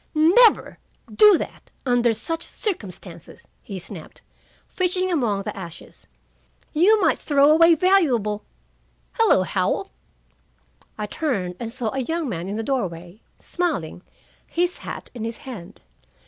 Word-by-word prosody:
"Never 370 Hz, +10 st, +4 dB, 0.3 s
do 420 Hz, -4 st, +7 dB
that, -, -, -8 dB, 0.2 s
under 245 Hz, -2 st, +3 dB
such 325 Hz, +10 st, -4 dB
circumstances," 185 Hz, -, -6 dB
he 195 Hz, -, -7 dB
snapped, 180 Hz, -2 st, -10 dB, 0.4 s
fishing 370 Hz, 0 st, -1 dB
among 225 Hz, -, 0 dB
the -, -, -5 dB
ashes. 170 Hz, -4 st, -11 dB, 0.7 s
"You 390 Hz, +8 st, +4 dB
might 330 Hz, -5 st, +2 dB
throw 285 Hz, 0 st, +4 dB
away 330 Hz, +1 st, +6 dB
valuable 265 Hz, -, +2 dB, 0.7 s
Hello, -, -, +3 dB
Howell!" -, -, -1 dB, 1.1 s
I 210 Hz, -, -3 dB
turned 205 Hz, -, -2 dB
and 230 Hz, -1 st, -5 dB
saw 230 Hz, -2 st, -3 dB
a 270 Hz, -, -2 dB
young 325 Hz, +4 st, -2 dB
man 175 Hz, -6 st, -4 dB
in 205 Hz, -, -3 dB
the 225 Hz, -, -3 dB
doorway, 185 Hz, -7 st, -4 dB, 0.2 s
smiling, 295 Hz, -, -3 dB, 0.5 s
his 350 Hz, +1 st, -1 dB
hat -, -, -8 dB
in 235 Hz, -3 st, -6 dB
his 230 Hz, 0 st, -4 dB
hand. 220 Hz, -10 st, -9 dB
250 Hz, 130 wpm, -23 LUFS, 200-335 Hz, 1.1 s, do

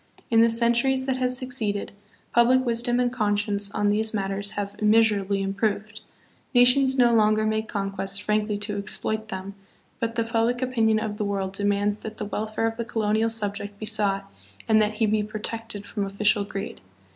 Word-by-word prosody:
In 225 Hz, -1 st, +6 dB
the 230 Hz, -, +5 dB
centuries 235 Hz, +3 st, +2 dB
that 265 Hz, -1 st, -1 dB
have 255 Hz, -1 st, 0 dB
succeeded, 250 Hz, -5 st, -2 dB, 0.4 s
public 255 Hz, +2 st, +4 dB
wisdom 240 Hz, +1 st, +1 dB
and 245 Hz, -1 st, +1 dB
conscience 205 Hz, -3 st, 0 dB
on 205 Hz, +1 st, 0 dB
these 220 Hz, +2 st, 0 dB
matters 195 Hz, 0 st, -2 dB
have 200 Hz, 0 st, -3 dB
immeasurably 210 Hz, -2 st, +3 dB
improved. 205 Hz, +2 st, -2 dB, 0.5 s
Nations 260 Hz, +2 st, +5 dB
no 240 Hz, -2 st, +5 dB
longer 215 Hz, -1 st, +3 dB
make 220 Hz, 0 st, -1 dB
conquests 195 Hz, -1 st, -2 dB
frankly 210 Hz, 0 st, 0 dB
to 205 Hz, 0 st, -3 dB
exploit 220 Hz, +2 st, -2 dB
them, 195 Hz, -1 st, -6 dB, 0.5 s
but 230 Hz, 0 st, -2 dB
the 230 Hz, -, +1 dB
public 230 Hz, +1 st, 0 dB
opinion 230 Hz, -4 st, +2 dB
of 215 Hz, -1 st, -3 dB
the 210 Hz, -, -1 dB
world 195 Hz, -2 st, -2 dB
demands 205 Hz, +1 st, 0 dB
that 220 Hz, 0 st, -8 dB
the -, -, -4 dB
welfare 215 Hz, +2 st, -2 dB
of 225 Hz, 0 st, -2 dB
the 235 Hz, -, -2 dB
co 225 Hz, -1 st, -3 dB
lonial 215 Hz, +2 st, +1 dB
subject 205 Hz, -2 st, -4 dB
be 215 Hz, -, -6 dB
sought 200 Hz, -2 st, 0 dB, 0.4 s
and 220 Hz, -1 st, +5 dB
that 210 Hz, 0 st, +1 dB
he 220 Hz, +1 st, +1 dB
be 215 Hz, 0 st, +1 dB
protected 215 Hz, 0 st, -5 dB
from 205 Hz, 0 st, -3 dB
official 200 Hz, +1 st, +1 dB
greed. 200 Hz, -, -6 dB
215 Hz, 180 wpm, -25 LUFS, 205-230 Hz, 0.5 s, In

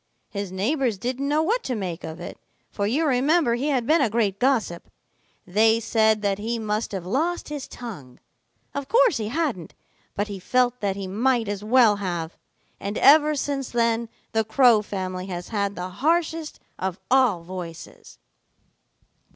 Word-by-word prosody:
His 200 Hz, -3 st, -4 dB
neighbors 230 Hz, +4 st, 0 dB
didn't 255 Hz, +6 st, -3 dB
know 300 Hz, +2 st, +2 dB
what 450 Hz, +9 st, +1 dB
to 255 Hz, -, -1 dB
make 185 Hz, -5 st, -4 dB
of 160 Hz, +1 st, -7 dB
it, -, -, -8 dB, 0.3 s
for 200 Hz, -1 st, -1 dB
you 290 Hz, +9 st, +1 dB
remember 280 Hz, 0 st, +3 dB
he 250 Hz, +5 st, -1 dB
had 260 Hz, -5 st, +1 dB
been 310 Hz, +4 st, +3 dB
a 255 Hz, -, +2 dB
great 210 Hz, -3 st, 0 dB
gossip. 235 Hz, -10 st, 0 dB, 0.6 s
They 220 Hz, +4 st, +3 dB
said 220 Hz, -1 st, +2 dB
that 200 Hz, -1 st, 0 dB
he 230 Hz, +3 st, -2 dB
must 215 Hz, 0 st, -2 dB
have 190 Hz, -4 st, -5 dB
lost 315 Hz, -, -1 dB
his 290 Hz, -2 st, -5 dB
tongue. 175 Hz, -, -9 dB, 0.5 s
Of 280 Hz, -1 st, -4 dB
course 485 Hz, -, +4 dB
he 215 Hz, -2 st, -3 dB
hadn't, 250 Hz, -, -2 dB, 0.4 s
but 205 Hz, +1 st, -1 dB
he 200 Hz, -2 st, -6 dB
felt 250 Hz, +4 st, +1 dB
that 200 Hz, -2 st, -1 dB
he 195 Hz, -1 st, -5 dB
might 230 Hz, +4 st, +1 dB
as 205 Hz, 0 st, -4 dB
well 225 Hz, -2 st, +5 dB
have. 175 Hz, -4 st, -4 dB, 0.4 s
And 200 Hz, +2 st, -4 dB
ever 300 Hz, +1 st, +6 dB
since 275 Hz, -2 st, -2 dB
then 230 Hz, -1 st, 0 dB, 0.2 s
the 220 Hz, 0 st, +1 dB
Crow 225 Hz, 0 st, +4 dB
family 185 Hz, -2 st, -5 dB
has 175 Hz, -2 st, -6 dB
had 200 Hz, -2 st, -1 dB
the 180 Hz, +1 st, -5 dB
harshest 320 Hz, -, -1 dB, 0.2 s
of 190 Hz, -1 st, -3 dB
all 250 Hz, -10 st, +3 dB
voices." 170 Hz, -, -9 dB
225 Hz, 165 wpm, -24 LUFS, 195-270 Hz, 0.6 s, ever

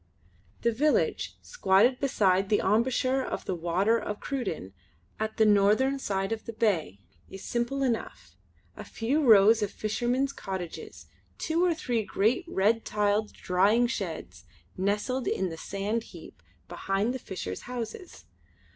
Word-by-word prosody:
The 235 Hz, -, +3 dB
village, 290 Hz, +7 st, 0 dB
squatted 245 Hz, -, +3 dB
beside 195 Hz, -8 st, +2 dB
the 210 Hz, -, +4 dB
emboucher 255 Hz, +5 st, +1 dB
of -, -, -5 dB
the -, -, -2 dB
Water 180 Hz, +7 st, +1 dB
of 210 Hz, -1 st, -5 dB
Cruden 200 Hz, -, -4 dB, 0.5 s
at 220 Hz, 0 st, -3 dB
the 220 Hz, -, +5 dB
northern 215 Hz, +7 st, +3 dB
side 195 Hz, -4 st, -2 dB
of 225 Hz, -1 st, -3 dB
the 230 Hz, -, -5 dB
bay 170 Hz, -, 0 dB, 0.3 s
is 195 Hz, -, -10 dB
simple 240 Hz, +3 st, -1 dB
enough; 240 Hz, -4 st, -3 dB, 0.4 s
a -, -, -8 dB
few 270 Hz, +7 st, -1 dB
rows 220 Hz, -2 st, +6 dB
of 205 Hz, -, 0 dB
fishermen's 245 Hz, +6 st, -1 dB
cottages, 190 Hz, -4 st, -7 dB, 0.3 s
two 330 Hz, +2 st, 0 dB
or 350 Hz, -2 st, +2 dB
three 240 Hz, -7 st, -1 dB
great 220 Hz, -, 0 dB
red 220 Hz, -1 st, +1 dB
tiled 210 Hz, 0 st, 0 dB
drying 200 Hz, +6 st, +2 dB
sheds 160 Hz, -, -5 dB, 0.3 s
nestled 210 Hz, +7 st, -1 dB
in 190 Hz, -1 st, 0 dB
the 165 Hz, -, -6 dB
sand 205 Hz, +6 st, -3 dB
heap 165 Hz, -, -13 dB, 0.3 s
behind 195 Hz, -, -1 dB
the 260 Hz, -, -4 dB
fishers' 95 Hz, -, -6 dB
houses. 245 Hz, -, -7 dB
215 Hz, 140 wpm, -28 LUFS, 195-245 Hz, 0.5 s, rows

